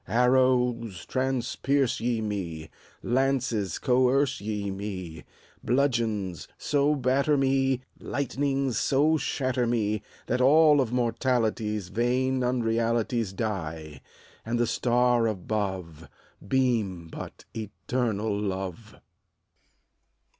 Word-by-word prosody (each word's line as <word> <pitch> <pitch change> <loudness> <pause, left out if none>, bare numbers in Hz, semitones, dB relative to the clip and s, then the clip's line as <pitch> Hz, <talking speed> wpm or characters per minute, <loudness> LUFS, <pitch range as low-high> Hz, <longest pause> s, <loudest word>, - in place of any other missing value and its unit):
Arrows, 125 -4 +2
transpierce 130 +1 0
ye 115 -1 0
me, 85 -7 -4 0.3
Lances, 125 - 0
coerce 130 +1 +2
ye 105 -1 -3
me, 95 -6 -6 0.4
Bludgeons, 115 - 0
so 145 +1 +1
batter 140 +2 +2
me, 135 -1 +2 0.2
Lightnings, 135 -1 -1
so 150 +3 +3
shatter 130 -4 -1
me, 110 -3 0 0.2
That 125 +2 0
all 150 +2 +6
of 120 -3 -2
mortality's 115 -4 0
Vain 125 +4 +1
unrealities 115 -2 0
Die, 80 -8 -4 0.4
and 115 +2 -1
the 120 - +2
Star 120 0 +2
above 95 -6 -3 0.4
Beam 110 -9 0
but - - -9
Eternal 110 -1 -2
Love 95 +1 -4
120 Hz, 90 wpm, -27 LUFS, 105-130 Hz, 0.4 s, all